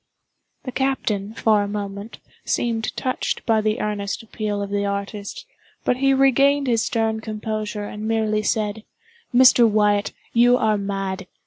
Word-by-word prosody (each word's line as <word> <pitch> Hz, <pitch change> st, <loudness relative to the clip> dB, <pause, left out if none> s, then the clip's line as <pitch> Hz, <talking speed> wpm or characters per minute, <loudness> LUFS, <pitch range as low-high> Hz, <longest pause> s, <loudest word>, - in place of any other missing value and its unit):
The 255 Hz, -, -5 dB
captain, 225 Hz, -6 st, -1 dB
for 215 Hz, -3 st, +3 dB
a 205 Hz, -, -2 dB
moment, 200 Hz, +1 st, -6 dB, 0.3 s
seemed 225 Hz, -2 st, -1 dB
touched 255 Hz, -1 st, -2 dB
by 220 Hz, -2 st, +3 dB
the 215 Hz, 0 st, 0 dB
earnest 205 Hz, 0 st, -3 dB
appeal 215 Hz, -2 st, -3 dB
of 200 Hz, -, -6 dB
the 205 Hz, 0 st, 0 dB
artist, 200 Hz, -, -4 dB, 0.4 s
but 250 Hz, -, +2 dB
he 270 Hz, +1 st, +3 dB
regained 275 Hz, +1 st, +4 dB
his 235 Hz, -3 st, +2 dB
stern 225 Hz, -1 st, 0 dB
composure, 215 Hz, -1 st, -4 dB
and 210 Hz, +1 st, -6 dB
merely 220 Hz, -1 st, +1 dB
said: 215 Hz, 0 st, -1 dB, 0.5 s
"Mr. 245 Hz, -2 st, +6 dB
Wyatt, 205 Hz, -1 st, +2 dB, 0.2 s
you 245 Hz, +1 st, +5 dB
are 215 Hz, -3 st, +1 dB
mad. 195 Hz, -1 st, -3 dB
215 Hz, 145 wpm, -22 LUFS, 205-235 Hz, 0.5 s, Mr